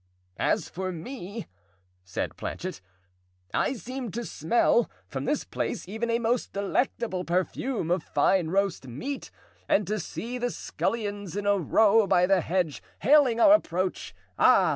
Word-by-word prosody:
"As - - +1
for 185 +1 -4
me," 200 +4 -7 0.6
said 95 - -4
Planchet, - - -5 0.7
"I - - +1
seem 255 0 -5
to 235 +2 -3
smell, 235 +8 +2 0.2
from - - -4
this - - 0
place, - - -3
even, 220 +4 -3
a 230 - +3
most 235 +1 -1
delectable 200 -1 -1
perfume 185 +3 -1
of 180 -1 +2
fine 180 +1 +2
roast 190 -5 0
meat, 255 - -5 0.4
and 205 - +3
to 215 +1 -1
see 235 +8 -5
the 245 0 0
scullions 205 -6 -3
in 205 - -3
a 205 -1 +3
row 215 +5 +4
by 180 0 +4
the 190 -1 +3
hedge, 170 -3 -1 0.2
hailing 265 -2 +5
our 300 +5 +8
approach. 185 - 0 0.2
Ah! - - +6
205 Hz, 145 wpm, -27 LUFS, 180-235 Hz, 0.7 s, our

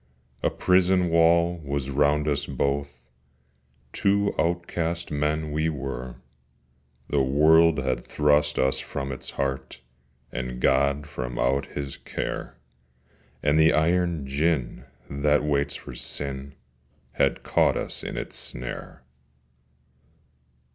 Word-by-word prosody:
A - - +2
prison 90 -1 +3
wall 85 +1 +4
was 70 -1 -3
round 75 +2 +2
us 75 -1 0
both, 70 -1 -2 0.9
Two 100 0 +2
outcast 85 0 -1
men 75 +1 -1
we 80 +2 +1
were: 65 -4 -5 0.9
The 70 - +2
world 80 +4 +5
had 65 -2 -1
thrust 75 0 +2
us 65 0 +2
from 70 0 -5
its 65 - -7
heart, 65 -2 -3 0.5
And 65 -1 -4
God 70 +2 +2
from 65 -4 -5
out 70 +2 +1
His 70 -1 -6
care: - - -5 0.9
And 75 +1 +3
the 80 0 +6
iron 85 -1 +1
gin 70 -1 -1 0.2
that 75 +1 +1
waits 70 -1 0
for - - -9
Sin 70 0 -5 0.6
Had - - +1
caught - - +2
us - - -4
in - - -5
its - - -5
snare. 60 +1 -6
75 Hz, 115 wpm, -25 LUFS, 70-80 Hz, 0.9 s, the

